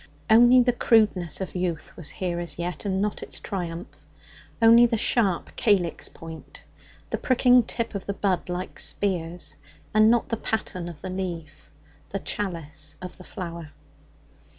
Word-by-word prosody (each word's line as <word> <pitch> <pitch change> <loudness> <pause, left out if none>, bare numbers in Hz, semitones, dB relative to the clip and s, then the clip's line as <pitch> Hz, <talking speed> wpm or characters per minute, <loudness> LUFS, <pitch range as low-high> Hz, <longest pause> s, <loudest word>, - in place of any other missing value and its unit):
Only 240 +3 +8
the 245 0 +2
crudeness 210 -8 +2
of 190 - -4
youth 180 -4 -3
was 165 -4 -2
here 175 -2 -3
as 175 -1 -2
yet, 175 +4 -4
and 190 0 0
not 210 - -2
its - - -5
triumph 175 -4 -6 0.6
only 230 +1 +7
the 230 - 0
sharp 205 -5 +1
calyx 190 -6 +1
point, 160 -1 -11 0.5
the - - -1
pricking 250 -1 +5
tip 230 0 -3
of 200 -2 -5
the 200 - -2
bud, 190 -3 0
like 180 +1 -4
spears, 175 -3 -1 0.4
and 215 +1 +6
not 235 0 +2
the 230 - -1
paten 185 -6 -3
of 160 -4 -12
the 185 - -4
leaf, 170 -5 -6 0.4
the 195 - -3
chalice 175 -7 -4
of 180 -1 -8
the - - -10
flower. 170 -6 -7
185 Hz, 155 wpm, -25 LUFS, 170-220 Hz, 0.6 s, Only